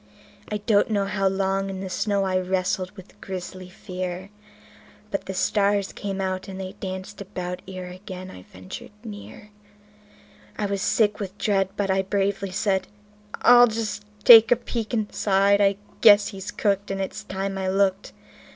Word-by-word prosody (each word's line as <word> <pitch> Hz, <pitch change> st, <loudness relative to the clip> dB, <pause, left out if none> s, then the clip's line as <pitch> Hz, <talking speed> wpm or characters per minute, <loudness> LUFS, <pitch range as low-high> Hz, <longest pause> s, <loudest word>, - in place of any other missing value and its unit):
I 210 Hz, -, 0 dB
do 210 Hz, 0 st, +2 dB
not 205 Hz, -, +2 dB
know 200 Hz, -2 st, +1 dB
how 195 Hz, -1 st, 0 dB
long 195 Hz, 0 st, 0 dB
in 190 Hz, -1 st, -5 dB
the 195 Hz, -, -4 dB
snow 200 Hz, +2 st, 0 dB
I 185 Hz, -1 st, +1 dB
wrestled 185 Hz, 0 st, -1 dB
with 190 Hz, +1 st, -14 dB
grisly 185 Hz, -1 st, -7 dB
fear; 185 Hz, 0 st, -6 dB, 0.8 s
But 195 Hz, -, -2 dB
the 190 Hz, -, -4 dB
stars 200 Hz, 0 st, +1 dB
came 195 Hz, -1 st, -4 dB
out 185 Hz, -1 st, -2 dB
and 190 Hz, -1 st, -7 dB
they 185 Hz, -1 st, -5 dB
danced 190 Hz, +1 st, -6 dB
about 180 Hz, -2 st, -5 dB
ere 185 Hz, -1 st, -7 dB
again 185 Hz, 0 st, -9 dB
I 90 Hz, -, -11 dB
ventured 95 Hz, 0 st, -10 dB
near; 210 Hz, -1 st, -10 dB, 1.1 s
I 210 Hz, -, -1 dB
was 200 Hz, -1 st, -2 dB
sick 210 Hz, 0 st, +2 dB
with 195 Hz, -1 st, -6 dB
dread, 195 Hz, -3 st, +1 dB
but 195 Hz, -1 st, 0 dB
I 190 Hz, 0 st, +2 dB
bravely 195 Hz, 0 st, -1 dB
said: 190 Hz, 0 st, 0 dB, 0.6 s
"I'll 245 Hz, 0 st, +8 dB
just 220 Hz, -2 st, -3 dB, 0.2 s
take 225 Hz, -1 st, +9 dB
a -, -, +8 dB
peep 230 Hz, -2 st, -5 dB
inside. 200 Hz, -3 st, +2 dB
I 200 Hz, -1 st, +3 dB, 0.2 s
guess 205 Hz, -1 st, +7 dB
he's 195 Hz, -1 st, -7 dB
cooked, 200 Hz, -1 st, 0 dB
and 195 Hz, 0 st, -3 dB
it's 195 Hz, +2 st, -4 dB
time 195 Hz, -1 st, -4 dB
I 190 Hz, -, -2 dB
looked" 195 Hz, 0 st, +1 dB
195 Hz, 170 wpm, -24 LUFS, 190-205 Hz, 1.1 s, take